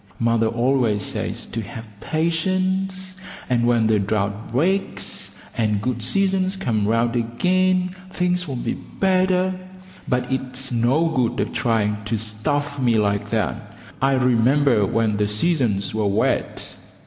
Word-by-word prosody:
Mother 115 Hz, -1 st, +2 dB
always 120 Hz, -3 st, +1 dB
says -, -, -3 dB
to 115 Hz, -, -4 dB
have 110 Hz, +2 st, -8 dB
patience, 185 Hz, -, -1 dB, 0.3 s
and 120 Hz, -2 st, +2 dB
when 120 Hz, -2 st, +3 dB
the 110 Hz, -1 st, +3 dB
drought 100 Hz, +2 st, -2 dB
breaks 180 Hz, +11 st, -1 dB, 0.2 s
and 105 Hz, -3 st, +1 dB
good 120 Hz, +2 st, -2 dB
seasons 190 Hz, -, +2 dB
come 110 Hz, -, -1 dB
round 115 Hz, +2 st, +1 dB
again 180 Hz, +10 st, +1 dB, 0.2 s
things 180 Hz, -1 st, 0 dB
will 135 Hz, -, -4 dB
be 120 Hz, -, -2 dB
better, 185 Hz, -1 st, +1 dB, 0.5 s
but 125 Hz, +1 st, -1 dB
it's 130 Hz, 0 st, -3 dB
no 125 Hz, +8 st, +2 dB
good 130 Hz, -7 st, 0 dB
of -, -, -1 dB
trying 105 Hz, -3 st, 0 dB
to 110 Hz, +1 st, -1 dB
stuff 140 Hz, +7 st, -2 dB
me 120 Hz, -3 st, +2 dB
like 100 Hz, -1 st, 0 dB
that. 110 Hz, -1 st, -2 dB, 0.2 s
I 135 Hz, +1 st, +3 dB
remember 125 Hz, -2 st, +3 dB
when 110 Hz, -1 st, +1 dB
the 105 Hz, 0 st, +1 dB
seasons 105 Hz, -, 0 dB
were 110 Hz, -1 st, 0 dB
wet. 100 Hz, -, -1 dB
120 Hz, 135 wpm, -22 LUFS, 110-170 Hz, 0.5 s, when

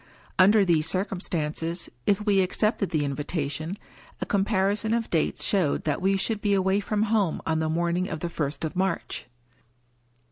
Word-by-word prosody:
Under 200 Hz, +2 st, +6 dB
these 160 Hz, -3 st, +2 dB
circumstances, 170 Hz, -3 st, -2 dB, 0.2 s
if 205 Hz, +1 st, +2 dB
we 200 Hz, -2 st, +4 dB
accepted 200 Hz, +2 st, 0 dB
the 150 Hz, -3 st, 0 dB
invitation, 150 Hz, +4 st, -3 dB, 0.4 s
a -, -, -2 dB
comparison 205 Hz, +2 st, +1 dB
of 230 Hz, -1 st, -2 dB
dates 160 Hz, -3 st, 0 dB
showed 185 Hz, -8 st, +1 dB
that 150 Hz, +1 st, -1 dB
we 195 Hz, +1 st, +2 dB
should 210 Hz, +2 st, -1 dB
be 205 Hz, -1 st, +2 dB
away 190 Hz, +1 st, +2 dB
from 210 Hz, +1 st, 0 dB
home 210 Hz, -6 st, +1 dB
on 160 Hz, -1 st, +1 dB
the 160 Hz, 0 st, 0 dB
morning 170 Hz, +3 st, 0 dB
of 160 Hz, -, -4 dB
the 175 Hz, -, -1 dB
first 155 Hz, -2 st, -3 dB
of 160 Hz, -, -5 dB
March. 185 Hz, -7 st, -2 dB
185 Hz, 165 wpm, -26 LUFS, 160-200 Hz, 0.4 s, Under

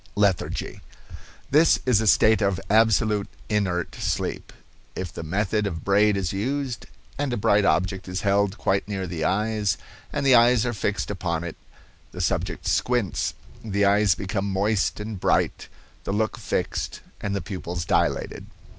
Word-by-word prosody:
LETHARGY. 100 Hz, -3 st, 0 dB, 0.7 s
This 155 Hz, +4 st, +5 dB
is 120 Hz, -5 st, +3 dB
a 110 Hz, -, -1 dB
state 110 Hz, +2 st, +5 dB
of 100 Hz, -2 st, +1 dB
absolute 110 Hz, -2 st, +3 dB, 0.2 s
inert 95 Hz, -5 st, 0 dB
sleep. -, -, -3 dB, 0.4 s
If 90 Hz, -3 st, -5 dB
the -, -, -6 dB
method 100 Hz, +5 st, 0 dB
of 80 Hz, -5 st, -5 dB
Braid 100 Hz, +1 st, +3 dB
is 95 Hz, -2 st, -2 dB
used, 130 Hz, +5 st, -3 dB, 0.3 s
and 145 Hz, -2 st, 0 dB
a 120 Hz, -, -1 dB
bright 100 Hz, 0 st, +3 dB
object 95 Hz, +3 st, +1 dB
is 90 Hz, 0 st, -3 dB
held 100 Hz, 0 st, +1 dB
quite 100 Hz, -1 st, 0 dB
near 100 Hz, -2 st, -3 dB
the 85 Hz, -3 st, -4 dB
eyes, 105 Hz, +1 st, 0 dB, 0.3 s
and 140 Hz, -, -2 dB
the 135 Hz, -, +6 dB
eyes 120 Hz, -1 st, +5 dB
are 120 Hz, -, -1 dB
fixed 105 Hz, 0 st, -2 dB
upon 85 Hz, -4 st, -2 dB
it, 85 Hz, -2 st, -6 dB, 0.6 s
the -, -, -8 dB
subject -, -, -1 dB
squints, 120 Hz, -9 st, 0 dB, 0.3 s
the 100 Hz, -2 st, +1 dB
eyes 100 Hz, -2 st, +4 dB
become 100 Hz, +1 st, -3 dB
moist 100 Hz, +2 st, 0 dB
and 105 Hz, -2 st, -5 dB
bright, -, -, +1 dB, 0.4 s
the -, -, -3 dB
look 110 Hz, +2 st, 0 dB
fixed, -, -, -3 dB, 0.2 s
and 100 Hz, -1 st, -2 dB
the -, -, 0 dB
pupils 90 Hz, -2 st, -5 dB
dilated. -, -, 0 dB
100 Hz, 155 wpm, -24 LUFS, 95-110 Hz, 0.7 s, the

